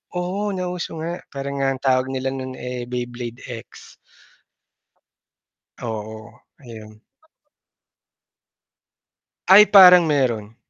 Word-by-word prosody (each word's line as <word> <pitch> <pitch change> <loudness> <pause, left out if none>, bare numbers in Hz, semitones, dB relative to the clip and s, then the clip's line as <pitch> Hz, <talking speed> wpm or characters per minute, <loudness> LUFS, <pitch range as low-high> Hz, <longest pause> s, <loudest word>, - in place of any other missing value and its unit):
oo, 190 +4 -3
nauso 180 -2 -5
nga, 170 +2 -5
parang 140 0 -6
nga 135 - 0
ang 130 - -14
tawag 130 -1 +1
nila 130 0 -3
no'n, 130 -1 -6
eh, 125 -1 -6
Beyblade 120 0 -7
X. 115 -3 -12 1.9
Oo, 110 -1 -8 0.2
ayun. 110 -4 -13 2.5
Ay, 200 +3 +8
parang 180 -3 +8
meron. 120 -7 -1
130 Hz, 95 wpm, -21 LUFS, 120-170 Hz, 2.5 s, Ay